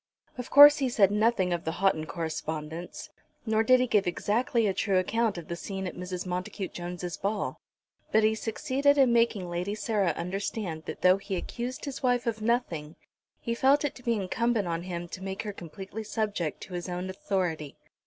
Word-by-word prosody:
Of 250 -1 -6
course 290 +1 +10
he 265 -2 +1
said 205 -5 +4
nothing 210 -4 +2
of 170 - -2
the 160 - -2
Houghton 180 -4 +1
correspondence, 160 0 -5 0.3
nor 220 -1 +2
did 255 +3 +5
he 255 - +3
give 210 -6 +2
exactly 225 +6 +1
a 195 - +1
true 195 0 +1
account 220 +2 +1
of 170 - -7
the 170 - -3
scene 190 +2 -5
at 180 - -4
Mrs. 180 0 -5
Montacute 180 +2 -4
Jones' 175 -1 -5
ball; 205 +1 -2 0.5
but 220 0 +4
he 215 0 +4
succeeded 265 +6 +1
in 260 -4 +5
making 230 -5 +2
Lady 175 +4 -3
Sarah 210 -6 0
understand 180 -2 -3
that - - -7
though 185 +1 +6
he 195 0 -4
accused 245 +9 -5
his 280 -2 -5
wife 245 -2 +1
of 225 -2 -2
nothing, 180 -10 -1 0.4
he 235 - -2
felt 275 +5 +3
it 290 - -1
to 250 - -13
be 235 -1 +1
incumbent 215 +1 0
on 165 0 -2
him 175 -1 -5
to 185 - -8
make 190 0 -4
her 210 -2 -5
completely 195 +5 -8
subject 210 -6 -2
to 185 - -9
his 175 +1 -4
own 180 +1 -3
authority. 180 -6 -2
195 Hz, 195 wpm, -28 LUFS, 175-230 Hz, 0.5 s, course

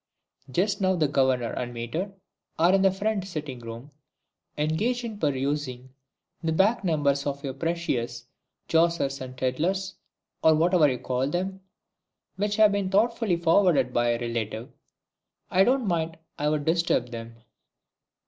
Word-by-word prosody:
"Just 195 +9 0
now 190 0 +3
the 160 -4 +2
Governor 130 -4 +1
and 120 -1 -4
Mater 155 - -3 0.5
are 170 +3 +4
in 195 - +4
the 195 - +5
front 200 +1 -1
sitting 150 -8 -5
room, 115 +4 -9 0.7
engaged 205 +12 0
in 220 -3 -6
perusing 135 -3 -2 0.5
the 160 - -1
back 195 +7 +2
numbers 145 -5 +1
of 140 0 -3
your 135 -2 -3
precious 130 -7 -2 0.4
'Jossers 165 -5 +1
and 130 0 -8
Tidlers' 180 +10 -1 0.5
or 160 -1 +6
whatever 165 -1 +4
you 125 - -1
call 130 +4 -1
'em, 190 +2 -3 0.7
which 205 +2 -1
have 215 -1 +6
been 200 -2 -1
thoughtfully 215 -1 +2
forwarded 165 -7 +3
by 120 0 +2
a 120 0 +1
relative. 115 -1 -4 0.8
I 190 - +5
don't 255 0 +2
think 165 -2 -1 0.2
I'd 150 0 0
disturb 165 -7 +1
them." 115 0 -7
160 Hz, 140 wpm, -26 LUFS, 130-190 Hz, 0.8 s, or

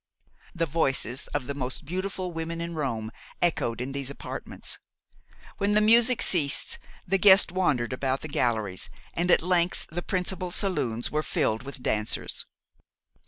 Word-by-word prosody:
The 165 -1 +1
voices 135 -5 0
of 145 -3 -3
the 140 - -3
most 130 -2 -4
beautiful 185 +2 -3
women 165 0 -4
in 170 0 -4
Rome 115 -8 -2 0.3
echoed 120 -9 +1
in 125 +2 -3
those 140 -1 -4
apartments. 140 - -5 0.8
When 200 +1 +2
the 210 - +6
music 230 +1 +5
ceased, 150 -6 +2 0.3
the 195 +2 +2
guests 195 -2 +7
wandered 135 -10 +1
about 130 +1 -1
the - - -5
galleries, 110 -9 -1 0.2
and 175 +2 0
at 175 - +5
length 180 0 +1
the 175 +2 -3
principal 185 0 -2
saloons 135 - -1
were 150 - +1
filled 110 -6 0
with 135 -1 -9
dancers. 105 0 -1
160 Hz, 150 wpm, -27 LUFS, 130-180 Hz, 0.8 s, guests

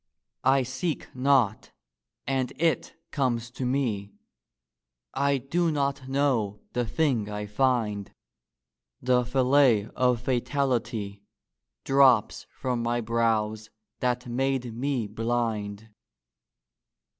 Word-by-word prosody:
I 135 0 +4
seek 135 +5 -4
not 125 -5 +2 0.5
and 130 -2 -1
it 165 0 0 0.2
comes 120 -4 -1
to 125 0 -3
me: 115 -7 -1 1.0
I 140 0 +2
do 165 +6 0
not 140 -2 -1
know 125 -7 +1
the 120 -1 -1
thing 125 -7 0
I 105 0 -4
find: 105 -3 0 0.9
The 125 0 +2
fillet 125 -3 +3
of 125 -2 +2
fatality 120 -5 -1 0.6
Drops 135 -5 +4
from 125 -2 -3
my 120 +1 0
brows 110 -2 0 0.3
that 125 -1 0
made 125 -1 -1
me 125 0 -1
blind. 110 -1 -2
125 Hz, 100 wpm, -27 LUFS, 110-135 Hz, 1.0 s, I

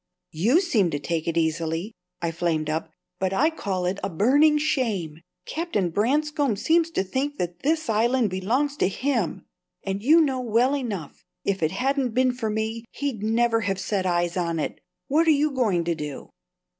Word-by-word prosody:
"You 225 - +3
seem 220 - +2
to 145 -2 -2
take 160 +2 -3
it 170 0 -1
easily," 165 +4 -1 0.3
I 170 - 0
flamed 160 -2 -1
up; 160 +1 -3 0.3
"but 190 0 0
I 305 +11 +3
call 190 - -3
it 185 +2 -1
a 195 - -1
burning 280 - +4
shame! 210 - -1 0.2
Captain 255 - -1
Branscome 285 - +1
seems 325 - +2
to 260 - -1
think 275 +9 -2
that 175 0 -3
this 315 +1 0
Island 230 0 +2
belongs 245 +11 0
to - - +2
him; 255 +5 -1 0.4
and 195 0 -3
you 305 +9 +6
know 270 -5 +1
well 245 +4 +2
enough, 210 - -5 0.2
if 195 -2 0
it 155 - +2
hadn't 265 - -1
been 255 0 +3
for 235 -3 -3
me, 220 +1 -2
he'd 275 -7 -4
never 225 +1 +2
have 195 -2 -1
set 190 -1 -1
eyes 175 -1 0
on 170 -3 -1
it. - - -4 0.3
What 320 +4 +2
are 310 -3 +5
you 300 +1 +1
going 215 -10 +1
to 170 0 0
do?" 150 -3 -7
220 Hz, 180 wpm, -25 LUFS, 175-275 Hz, 0.4 s, you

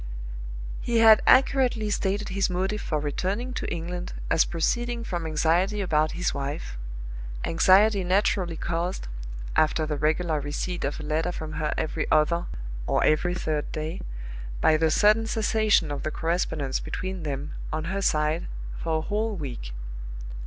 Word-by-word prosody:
He 235 -1 0
had 225 -1 +8
accurately 255 -5 +4
stated 205 +1 0
his 195 +1 +1
motive 190 +4 -1
for 155 - -1
returning 195 - -2
to - - -3
England 175 +1 -4 0.2
as 165 - +5
proceeding 235 +8 -1
from 175 -6 -3
anxiety 170 +6 +2
about 155 -5 +1
his 175 +1 -1
wife 140 - -4 0.7
anxiety 195 +4 +5
naturally 185 -2 +1
caused 170 - -2 0.5
(after 155 0 +3
the 150 -1 -2
regular 155 +1 +1
receipt 145 +5 -3
of 140 - -2
a - - -6
letter 155 +3 0
from 155 -3 -5
her 150 - 0
every 155 - -1
other, 170 +3 +3 0.4
or - - +2
every 175 +4 +2
third 155 -4 -2
day) 155 +4 -4 0.6
by 155 - +5
the 160 +1 +3
sudden 215 +6 +4
cessation 215 -6 +2
of 145 - -3
the - - -2
correspondence 160 -4 -1
between 185 -1 -4
them 145 -1 -4 0.2
on 155 - -2
her 190 +4 -2
side 155 -2 +1 0.3
for 160 -1 0
a - - -1
whole 215 +5 -1
week. 125 - -5
170 Hz, 150 wpm, -26 LUFS, 155-200 Hz, 0.7 s, had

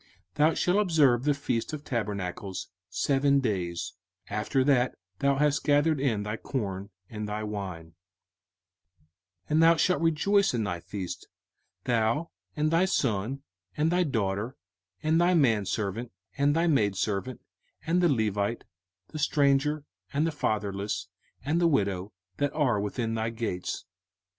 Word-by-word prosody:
05:016:013 - - -30 0.2
Thou 155 +6 +4
shalt 180 +2 +2
observe 150 - +4
the 150 - +4
feast 130 -1 -2
of 150 -1 -5
tabernacles 100 - -3 0.2
seven 140 +6 +2
days, 90 -8 -2 0.4
after 105 +6 +1
that 130 -2 +3 0.2
thou 140 0 +3
hast 150 +1 +2
gathered 145 +1 +3
in 115 -7 0
thy 105 +1 -3
corn 100 -7 -4 0.2
and 105 -1 -5
thy 105 +1 -3
wine: 95 -6 -5 1.5
05:016:014 - - -14
And 155 +1 +4
thou 165 +1 +7
shalt 180 +5 +2
rejoice 195 +4 +3
in 115 - 0
thy 90 -4 -2
feast, 95 +1 -6 0.6
thou, 120 +7 +1 0.2
and 155 0 +1
thy 165 +3 +4
son, 130 - -1 0.3
and 155 +2 +2
thy 180 +1 +3
daughter, 110 - -1 0.5
and 160 +2 +3
thy 180 +1 +4
manservant, 110 - +1 0.2
and 145 +1 +2
thy 165 +1 +2
maidservant, 110 - 0 0.5
and 175 +2 +2
the 175 - +4
Levite, 110 -3 0 0.5
the 155 - -6
stranger, 145 0 +2 0.3
and 150 +2 +1
the 165 - 0
fatherless, 105 -6 -2 0.4
and 160 +4 +1
the 170 - +5
widow, 100 - 0 0.3
that 145 0 0
are 130 -9 +2
within 115 +2 -2
thy 110 0 -1
gates. 110 -6 -4
125 Hz, 145 wpm, -28 LUFS, 105-150 Hz, 1.5 s, thou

